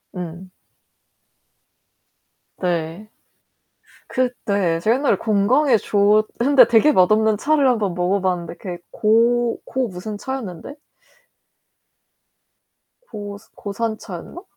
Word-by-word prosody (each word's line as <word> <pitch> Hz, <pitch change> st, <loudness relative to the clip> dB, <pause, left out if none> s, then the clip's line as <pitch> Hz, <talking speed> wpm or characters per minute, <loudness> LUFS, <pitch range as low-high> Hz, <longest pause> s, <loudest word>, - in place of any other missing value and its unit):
음. 180 Hz, +1 st, -7 dB, 2.1 s
네. 175 Hz, +3 st, -3 dB, 1.0 s
그때 200 Hz, -9 st, -1 dB
제가 220 Hz, +7 st, +2 dB
옛날에 275 Hz, +1 st, +1 dB
건강에 230 Hz, +6 st, +2 dB
좋 210 Hz, +1 st, +2 dB
근데 260 Hz, 0 st, +6 dB
되게 240 Hz, +6 st, +4 dB
맛없는 215 Hz, +1 st, +3 dB
차를 290 Hz, +1 st, +2 dB
1 245 Hz, -2 st, +2 dB
번 200 Hz, -4 st, -2 dB
먹어 180 Hz, +3 st, 0 dB
봤는데 180 Hz, -3 st, -2 dB
그게 180 Hz, -3 st, -7 dB
고, 235 Hz, +2 st, +2 dB
고 260 Hz, -2 st, -2 dB
무슨 205 Hz, +3 st, -7 dB
차였는데. 245 Hz, -, -6 dB, 2.3 s
고 205 Hz, -, -8 dB, 0.2 s
고산차였나? 215 Hz, -, -6 dB
215 Hz, 180 characters per minute, -20 LUFS, 185-240 Hz, 2.3 s, 근데